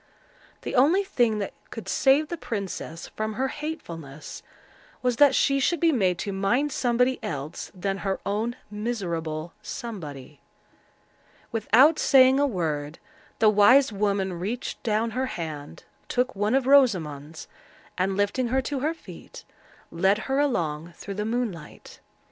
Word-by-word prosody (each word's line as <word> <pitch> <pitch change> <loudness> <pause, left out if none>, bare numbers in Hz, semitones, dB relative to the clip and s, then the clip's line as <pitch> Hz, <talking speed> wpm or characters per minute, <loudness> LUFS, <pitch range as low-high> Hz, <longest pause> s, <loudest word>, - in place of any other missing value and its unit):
The - - -4
only 310 +10 +4
thing 240 - +1
that 200 - -4 0.2
could - - -8
save 285 +3 +3
the 345 - -2
princess 195 - -5
from 215 0 -4
her 265 +5 -1
hatefulness, 165 - -7 0.6
was 250 -2 +1
that 290 0 +6
she 275 0 +3
should 340 +5 +1
be 335 -1 +4
made 190 - +1
to 200 - -3
mind 240 +10 +1
somebody 250 +1 +1
else 145 +1 -5
than 195 +1 -2
her 195 -1 -2
own 220 +4 -1 0.2
miserable 170 -8 -3
Somebody. 155 - -8 1.1
Without 250 +7 +4
saying 265 -1 +6
a 285 - +3
word, 155 - -3 0.4
the 220 - +4
wise 220 +5 +5
woman 200 -2 0
reached 220 +7 -4
down 225 +1 0
her 260 +4 -1
hand, 155 - -6 0.2
took 255 0 0
one 210 +5 +1
of 270 -2 +2
Rosamond's, 165 - +2 0.5
and, 190 +1 0
lifting 205 +5 +1
her 260 +3 +1
to 280 +1 -3
her 310 +5 -1
feet, - - -12 0.5
led 190 +4 +2
her 270 +1 0
along 170 - -1
through 200 - -7
the 210 +2 -3
moonlight. 220 -9 -5
215 Hz, 140 wpm, -26 LUFS, 175-260 Hz, 1.1 s, that